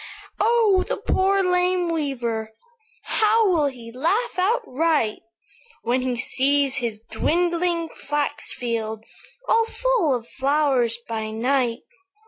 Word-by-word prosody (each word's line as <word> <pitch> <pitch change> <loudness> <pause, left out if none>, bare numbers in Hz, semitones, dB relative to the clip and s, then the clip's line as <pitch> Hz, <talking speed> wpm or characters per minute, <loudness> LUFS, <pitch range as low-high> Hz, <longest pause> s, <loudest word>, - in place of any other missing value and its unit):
"'Oh! 430 -3 +3
the - - -2
poor, 390 +1 +1
lame 360 0 +2
weaver, 235 -8 -3 0.5
How 440 0 +3
will 325 -6 +3
he 240 -4 -8
laugh 365 - -1
outright 325 - +1 0.6
When 245 +2 +1
he 255 -1 -1
sees 275 +3 +1
his 225 -3 -3
dwindling 345 0 0
flax 295 0 -2
field 225 -2 -4 0.4
All 455 0 +3
full 455 - +1
of 235 -1 -6
flowers 270 -4 +1
by 220 -1 -3
night!' 240 +1 0
285 Hz, 110 wpm, -23 LUFS, 240-365 Hz, 0.6 s, Oh